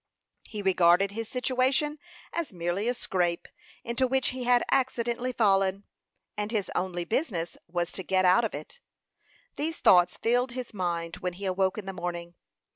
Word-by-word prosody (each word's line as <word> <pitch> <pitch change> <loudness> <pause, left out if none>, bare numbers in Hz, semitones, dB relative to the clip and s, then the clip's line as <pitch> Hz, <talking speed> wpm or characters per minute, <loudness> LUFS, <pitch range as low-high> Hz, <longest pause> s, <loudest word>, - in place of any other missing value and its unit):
He 210 -2 -6
regarded 185 +1 +4
his 225 +1 -5
situation 260 +4 +1 0.3
as 335 -2 -2
merely 175 +4 -2
a 245 - +2
"scrape" 175 -6 -1 0.4
into 240 +2 0
which 265 +1 +1
he 255 -1 -5
had 245 0 +4
accidentally 250 -2 0
fallen, 195 -4 +2 0.5
and 210 0 -2
his 215 -4 -2
only 175 -1 -2
business 190 - -1
was 175 0 -2
to - - -4
get 185 0 +1
out 185 +6 +5
of 220 - -2
it. 155 - -9 0.8
These 320 +2 -2
thoughts 175 -1 +5
filled 245 +2 +1
his 255 -2 -6
mind 170 -3 -2
when 180 -1 -3
he 195 +3 -7
awoke 190 +1 +1
in 210 - -5
the 195 - -5
morning. 175 -1 -5
200 Hz, 165 wpm, -28 LUFS, 180-245 Hz, 0.8 s, out